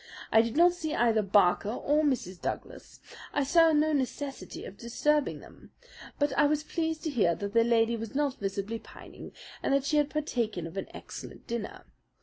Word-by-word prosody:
I 225 Hz, -, +7 dB
did 230 Hz, +4 st, -3 dB
not 345 Hz, +1 st, +6 dB
see 315 Hz, -3 st, -3 dB
either 230 Hz, -2 st, +3 dB
Barker 200 Hz, -1 st, +3 dB
or 295 Hz, +6 st, +1 dB
Mrs. 215 Hz, -, -1 dB
Douglas. -, -, -6 dB, 0.3 s
I 285 Hz, -, +1 dB
saw 330 Hz, +3 st, +5 dB
no 310 Hz, 0 st, +3 dB
necessity 270 Hz, -, -3 dB
to -, -, -7 dB
disturb 275 Hz, +8 st, 0 dB
them; -, -, -10 dB, 0.4 s
but 290 Hz, -2 st, 0 dB
I 295 Hz, -, +5 dB
was 300 Hz, +1 st, 0 dB
pleased 320 Hz, -1 st, -2 dB
to 315 Hz, -, -2 dB
hear 200 Hz, -10 st, +2 dB
that 200 Hz, 0 st, -5 dB
the 230 Hz, 0 st, +5 dB
lady 230 Hz, 0 st, +2 dB
was 225 Hz, +2 st, -7 dB
not 280 Hz, -2 st, 0 dB
visibly 200 Hz, +3 st, -3 dB
pining -, -, -12 dB, 0.3 s
and 275 Hz, -, +2 dB
that 275 Hz, -1 st, +1 dB
she 300 Hz, +1 st, +1 dB
had 295 Hz, -1 st, +2 dB
partaken 235 Hz, -, -2 dB
of 165 Hz, -, -8 dB
an 195 Hz, -, -4 dB
excellent -, -, -10 dB
dinner. 230 Hz, -3 st, -5 dB
255 Hz, 185 wpm, -29 LUFS, 215-300 Hz, 0.4 s, I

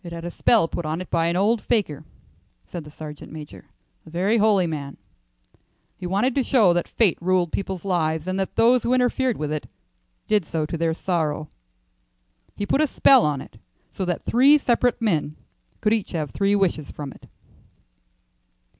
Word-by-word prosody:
"It 170 Hz, -, -8 dB
had 170 Hz, 0 st, -7 dB
a 175 Hz, -, -4 dB
spell 220 Hz, -4 st, +3 dB
put 175 Hz, -, -4 dB
on 155 Hz, +1 st, -3 dB
it 185 Hz, -, -8 dB
by 165 Hz, 0 st, +2 dB
an 170 Hz, -, 0 dB
old 210 Hz, +4 st, +2 dB
fakir," 155 Hz, -, -1 dB, 0.6 s
said 175 Hz, -3 st, -7 dB
the 150 Hz, -, -12 dB
sergeant 150 Hz, -1 st, -10 dB
major, 150 Hz, -2 st, -10 dB, 0.4 s
"a -, -, -14 dB
very 190 Hz, +7 st, +1 dB
holy 205 Hz, -3 st, +3 dB
man. 145 Hz, -4 st, -5 dB, 1.0 s
He 180 Hz, -, -6 dB
wanted 205 Hz, +8 st, +1 dB
to 270 Hz, -, +1 dB
show 225 Hz, -9 st, +4 dB
that 175 Hz, 0 st, -1 dB
fate 210 Hz, -8 st, +2 dB
ruled 180 Hz, -1 st, +1 dB
people's 190 Hz, -1 st, -4 dB
lives, 160 Hz, -4 st, 0 dB
and 185 Hz, +1 st, -2 dB
that 190 Hz, -, -3 dB
those 245 Hz, +2 st, +4 dB
who 245 Hz, +3 st, +1 dB
interfered 250 Hz, -1 st, +1 dB
with 150 Hz, -1 st, -3 dB
it 155 Hz, -1 st, -4 dB, 0.6 s
did 210 Hz, -3 st, +2 dB
so 155 Hz, -1 st, -2 dB
to 160 Hz, -, -5 dB
their 165 Hz, 0 st, 0 dB
sorrow. 155 Hz, -4 st, -2 dB, 1.1 s
He 205 Hz, -, -3 dB
put 275 Hz, -, +1 dB
a 310 Hz, -, +3 dB
spell 265 Hz, -1 st, +5 dB
on 145 Hz, -3 st, 0 dB
it 110 Hz, -, -14 dB, 0.3 s
so 190 Hz, -, -3 dB
that 175 Hz, -1 st, -3 dB
three 275 Hz, +5 st, +5 dB
separate 245 Hz, -3 st, +1 dB
men 160 Hz, -9 st, 0 dB, 0.5 s
could 210 Hz, -, +2 dB
each 220 Hz, -4 st, -2 dB
have 155 Hz, -4 st, -3 dB
three 200 Hz, 0 st, +1 dB
wishes 175 Hz, -7 st, 0 dB
from 145 Hz, -3 st, -7 dB
it." -, -, -17 dB
180 Hz, 185 wpm, -23 LUFS, 155-220 Hz, 1.1 s, spell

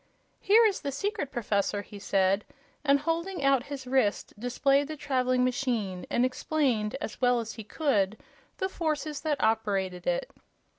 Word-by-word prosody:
"Here 440 Hz, +4 st, +5 dB
is 410 Hz, -3 st, +1 dB
the 280 Hz, -, -3 dB
secret, 380 Hz, 0 st, -2 dB
Professor," 205 Hz, -3 st, 0 dB
he 205 Hz, -, -11 dB
said, 195 Hz, 0 st, +2 dB, 0.4 s
and 280 Hz, -1 st, +4 dB
holding 335 Hz, +2 st, -2 dB
out 275 Hz, -1 st, +3 dB
his 275 Hz, -2 st, -6 dB
wrist 250 Hz, -5 st, +1 dB
displayed 275 Hz, +4 st, +2 dB
the 310 Hz, 0 st, -6 dB
traveling 255 Hz, -2 st, +1 dB
machine 240 Hz, -8 st, -1 dB
and 240 Hz, -, +2 dB
explained, 255 Hz, -4 st, 0 dB
as 220 Hz, -, -6 dB
well 245 Hz, -1 st, +4 dB
as 225 Hz, -1 st, -5 dB
he 220 Hz, -, -8 dB
could, 215 Hz, -5 st, 0 dB, 0.4 s
the 380 Hz, -, 0 dB
forces 305 Hz, -5 st, -2 dB
that 300 Hz, -2 st, -1 dB
operated 195 Hz, -5 st, 0 dB
it. -, -, 0 dB
255 Hz, 155 wpm, -28 LUFS, 215-295 Hz, 0.4 s, Here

